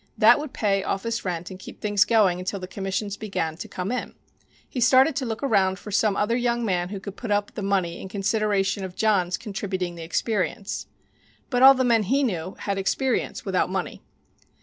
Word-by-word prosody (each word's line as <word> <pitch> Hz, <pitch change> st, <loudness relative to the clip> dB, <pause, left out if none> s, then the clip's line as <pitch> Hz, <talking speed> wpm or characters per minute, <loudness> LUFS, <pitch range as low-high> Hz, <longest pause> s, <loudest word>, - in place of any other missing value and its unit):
That 230 Hz, +5 st, +6 dB
would 300 Hz, -2 st, -6 dB
pay 200 Hz, -5 st, +1 dB
office 230 Hz, +4 st, -2 dB
rent 175 Hz, -1 st, -4 dB
and 185 Hz, -, -9 dB
keep -, -, -11 dB
things 205 Hz, -1 st, +3 dB
going 205 Hz, -6 st, +3 dB
until 190 Hz, +2 st, -3 dB
the 185 Hz, -, -6 dB
commissions 195 Hz, +2 st, -3 dB
began 165 Hz, -7 st, -3 dB
to -, -, -7 dB
come 185 Hz, +3 st, -4 dB
in. 250 Hz, -, -4 dB, 0.5 s
He 250 Hz, -, -4 dB
started 260 Hz, +4 st, +5 dB
to 265 Hz, -3 st, -1 dB
look 225 Hz, +3 st, -4 dB
around 195 Hz, -7 st, +2 dB
for 210 Hz, -, -9 dB
some 205 Hz, 0 st, +2 dB
other 210 Hz, +4 st, +1 dB
young 240 Hz, -1 st, 0 dB
man 180 Hz, -3 st, 0 dB
who 200 Hz, 0 st, -5 dB
could 200 Hz, 0 st, -8 dB
put 235 Hz, -, -7 dB
up 205 Hz, 0 st, 0 dB
the -, -, -5 dB
money 190 Hz, -4 st, -1 dB
in 190 Hz, -, -8 dB
consideration 200 Hz, -1 st, 0 dB
of 185 Hz, -1 st, -6 dB
John's 190 Hz, -5 st, +2 dB
contributing 195 Hz, -4 st, -4 dB
the 170 Hz, -, -9 dB
experience. 195 Hz, +3 st, -2 dB, 0.6 s
But 245 Hz, -1 st, +1 dB
all 270 Hz, +1 st, +10 dB
the 260 Hz, -, +1 dB
men 235 Hz, -3 st, +4 dB
he 270 Hz, +8 st, +1 dB
knew 185 Hz, -6 st, -2 dB
had 200 Hz, -1 st, -2 dB
experience 255 Hz, +7 st, -1 dB
without -, -, +1 dB
money. -, -, -3 dB
205 Hz, 200 wpm, -25 LUFS, 190-230 Hz, 0.6 s, all